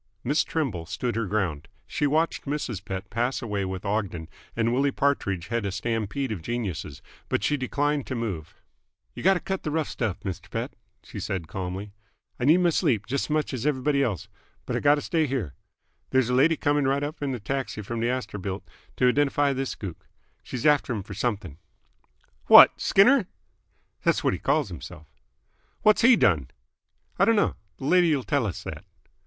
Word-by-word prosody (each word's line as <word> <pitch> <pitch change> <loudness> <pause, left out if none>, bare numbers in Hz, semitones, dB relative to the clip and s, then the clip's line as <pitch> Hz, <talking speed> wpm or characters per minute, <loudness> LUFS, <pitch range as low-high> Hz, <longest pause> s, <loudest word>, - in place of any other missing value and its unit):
Miss 145 +5 +2
Trimble 115 - -2
stood 105 +7 -2
her 115 -2 -1
ground. 90 -8 -1 0.2
She 150 -2 0
watched 160 +3 0
Mrs. 135 -9 -3
Pett 95 0 -6
pass 120 +5 0
away 105 -4 -2
with 95 +1 -5
Ogden, 100 -6 -2 0.3
and 115 0 +1
Willie 140 +3 +2
Partridge 105 - 0
head 115 -1 -1
a 100 - -2
stampede 115 +5 -2
of 100 -6 -4
geniuses, 95 - -4 0.3
but - - 0
she 145 - +2
declined 145 +1 -1
to 130 - -3
move. 100 -10 -4 0.6
"Y' - - -8
gotta 190 -1 +4
cut 190 +2 -3
th' - - -7
rough 155 0 0
stuff, 110 -6 -2
'ster 95 - -6
Pett," - - -4 0.3
she - - -8
said 90 -4 -3
calmly. 95 +4 -5 0.5
"I 125 - 0
need 155 +5 +6
my 175 -1 +3
sleep, 125 - +1
j'st 140 +2 -1
's - - -22
much 150 -2 0
's 125 -3 -3
everyb'dy 140 0 +1
else, 110 - -1 0.4
but - - -3
I - - +1
gotta 145 0 +4
stay 160 -1 0
here. 120 - -3 0.6
There's 130 -2 +2
a - - +1
lady 150 +6 +4
c'ming 145 -1 +1
right 140 +1 +1
up 150 +2 -5
in 135 -3 -1
a - - -6
taxi 130 -1 -3
fr'm 115 +3 -4
th' - - +1
Astorbilt 105 -6 -3 0.3
to 125 - +4
identify 140 +1 +2
this 135 0 -3
gook. 95 -6 -8 0.3
She's 125 +1 -6
after'm 140 -8 +2
f'r 100 0 -9
something." 100 - -3 0.9
"What! - - +9
Skinner?" 225 +1 +5 0.8
"'s - - +2
what - - +2
he - - -3
calls - - +1
h'mself." - - -9 0.8
"What's 215 -1 +5
he 240 +1 +7
done?" 80 - +2 0.7
"I - - +6
d'no. 225 -3 +4 0.3
Th' - - -22
lady'll 155 -1 +3
tell 140 -5 0
us 95 - -5
that." - - -7
125 Hz, 180 wpm, -26 LUFS, 100-145 Hz, 0.9 s, What